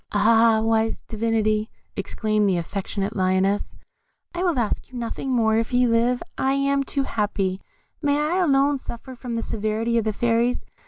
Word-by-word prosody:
"Ah! 225 +1 +4
wise 225 0 +1
Divinity," 220 -1 0 0.3
exclaimed 215 -2 0
the 185 - +1
affectionate 195 +4 -3
Lioness, 190 +1 +1 0.6
"I 350 - -3
will 350 -6 +1
ask 235 +1 -2
you 250 - -7
nothing 240 +3 -4
more; 225 -3 +3
if 230 - -2
he 250 0 +3
live, 240 +1 +2 0.2
I 265 0 +2
am 275 0 +1
too 275 0 -1
happy. 200 -5 -1 0.4
May 285 0 +2
I 305 +4 0
alone 285 -5 +3
suffer 260 +1 -8
from 245 -1 -6
the 230 - -2
severity 220 +2 -1
of - - -1
the 215 - +1
Fairies! 235 +2 +1
230 Hz, 165 wpm, -23 LUFS, 215-255 Hz, 0.6 s, Ah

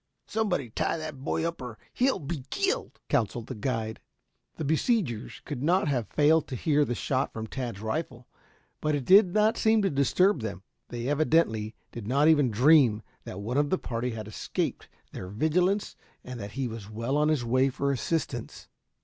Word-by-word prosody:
Somebody 180 - -1
tie 165 - -1
that 155 -4 -7
boy 160 +3 0
up 170 -4 -5
or 120 -3 -7 0.2
he'll 260 -1 +2
be 155 -4 -5
killed," 395 +5 -1
counseled 120 -4 0
the - - -6
guide. 110 -1 -3 0.6
The 155 - -4
besiegers 160 - 0
could 140 -5 -5
not 175 +4 +2
have 125 -7 0
failed 155 +4 +3
to 130 - -5
hear 150 +4 +2
the 120 -3 -2
shot 135 +2 -1
from 110 0 -5
Tad's 120 -4 -5
rifle, 125 +1 -4 0.5
but 150 -1 +1
it 140 -3 -3
did 190 -1 +7
not 215 +3 +3
seem 220 -1 +3
to 195 - +1
disturb 145 - +3
them. 100 -3 -5 0.3
They 120 0 -4
evidently 145 -8 +1 0.2
did 115 -4 -7
not 140 +5 +3
even 145 -5 +5
dream 120 -2 +5 0.2
that 95 - -7
one 120 +6 -2
of 145 0 +2
the 185 - +2
party 120 -3 -3
had 110 -3 -6
escaped 110 - -3 0.2
their 90 - -7
vigilance 175 - +1 0.3
and 125 -1 -7
that 100 -1 -7
he 135 -1 -2
was 110 -3 -8
well 115 +5 -2
on 150 +1 +3
his 145 -6 +1
way 130 +3 +3
for 140 +1 -1
assistance. 135 -3 -3
135 Hz, 185 wpm, -28 LUFS, 115-160 Hz, 0.6 s, did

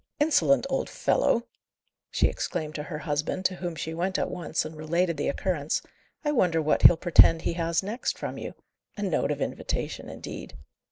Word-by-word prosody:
"Insolent 290 -2 +3
old 270 0 -1
fellow!" 235 +1 +1 0.6
she - - +2
exclaimed 155 -4 -3
to 150 - -4
her 150 +1 -6
husband, 155 +4 -2
to 185 -1 +1
whom 175 -2 -4
she 160 +2 -4
went 185 +3 -1
at - - -1
once 165 -3 -2
and 155 +1 -7
related 170 +3 0
the 145 - -2
occurrence. 155 -2 -1 0.4
"I 295 - +2
wonder 180 - +2
what 155 -1 +1
he'll 170 - +8
pretend 165 -1 +6
he - - 0
has 170 +1 0
next 220 +6 -3
from - - -5
you? - - -6 0.4
A 205 - -3
note 185 -5 0
of - - -2
invitation, - - -3
indeed!" - - -8
170 Hz, 180 wpm, -27 LUFS, 155-190 Hz, 0.6 s, he'll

